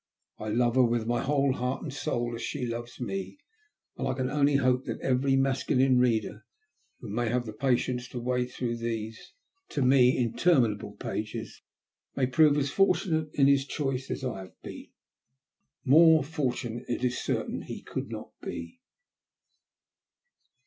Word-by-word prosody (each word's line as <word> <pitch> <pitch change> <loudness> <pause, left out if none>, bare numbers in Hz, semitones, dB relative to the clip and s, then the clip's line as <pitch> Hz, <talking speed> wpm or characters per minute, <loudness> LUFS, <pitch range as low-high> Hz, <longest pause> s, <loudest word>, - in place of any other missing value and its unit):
I 110 - -5
love 120 +3 +1
her 130 - +7
with 120 -1 +1
my 120 +1 0
whole 140 -1 +2
heart 125 +1 -3
and 150 -5 -5
soul, 120 -4 -2
as 115 - -5
she 125 +2 -3
loves 120 0 -6
me, 195 - -4 0.6
and - - -3
I - - -1
can 130 -1 -2
only 145 -1 +3
hope 130 -1 +2
that - - -4
every 135 +1 +2
masculine 130 -1 +2
reader 110 -3 0 0.6
who - - -8
may 120 +2 0
have 120 +1 0
the 110 - -6
patience 125 +1 0
to 125 - -6
wade 125 +1 -1
through 120 -2 -3
these, 115 -1 -5 0.4
to 140 - -1
me, 125 -1 +5
interminable 120 -5 +1
pages, 110 +2 -5 0.5
may 135 - +2
prove 145 +4 +4
as 140 -2 0
fortunate 165 -4 +2
in 140 - +4
his 140 0 +3
choice 135 -3 -3
as - - -4
I 125 -6 -3
have 95 -1 -12
been. - - -9 1.0
More 160 +3 +7
fortunate, 125 -5 -3
it 120 - -3
is 125 0 0
certain, - - -2
he - - -8
could - - -5
not - - -7
be. 85 +9 -7
125 Hz, 160 wpm, -28 LUFS, 120-135 Hz, 1.0 s, her